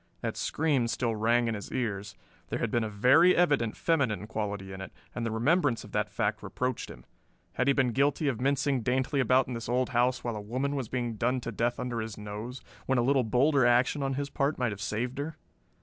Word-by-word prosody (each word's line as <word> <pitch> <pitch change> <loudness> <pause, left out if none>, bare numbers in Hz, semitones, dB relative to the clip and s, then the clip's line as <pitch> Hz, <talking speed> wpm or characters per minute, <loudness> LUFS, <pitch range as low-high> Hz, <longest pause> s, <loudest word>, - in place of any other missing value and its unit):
That - - -3
scream 145 -6 +1
still 115 -1 -1
rang 115 +2 +2
in 115 - 0
his 105 -2 -6
ears; 105 -5 -3 0.3
there - - -1
had - - -2
been 120 - +1
a 110 - -2
very 130 - +5
evident 145 -10 +2
feminine 130 - +1
quality 100 -3 -4
in 95 - -7
it, 95 - -7 0.2
and 120 - -4
the 115 - -1
remembrance 125 +3 +1
of - - -12
that - - 0
fact - - -1
reproached 125 -1 -3
him. - - -12 0.5
Had 130 - 0
he 140 - +5
been 130 -3 +2
guilty 140 +4 +1
of 125 -5 -1
mincing 135 -1 +1
daintily 130 +4 0
about 130 +1 +3
in 125 - -4
this 115 -1 -5
old 125 +1 +1
house 125 +1 +1
while 120 -2 -2
a 105 - -4
woman 130 +7 -2
was 130 -5 -3
being 120 -3 -2
done 125 +3 +1
to 115 - -4
death 120 +3 -1
under 120 -2 -2
his 110 -1 -5
nose, 105 +5 -7 0.2
when 130 - +2
a 120 - +3
little 135 +1 +3
bolder 130 +5 +3
action 125 +4 +3
on 135 -1 -1
his 140 0 -3
part 140 +2 0
might 125 -3 0
have 100 -1 -7
saved 120 +5 -2
her? 150 +2 -4
125 Hz, 225 wpm, -29 LUFS, 110-135 Hz, 0.5 s, very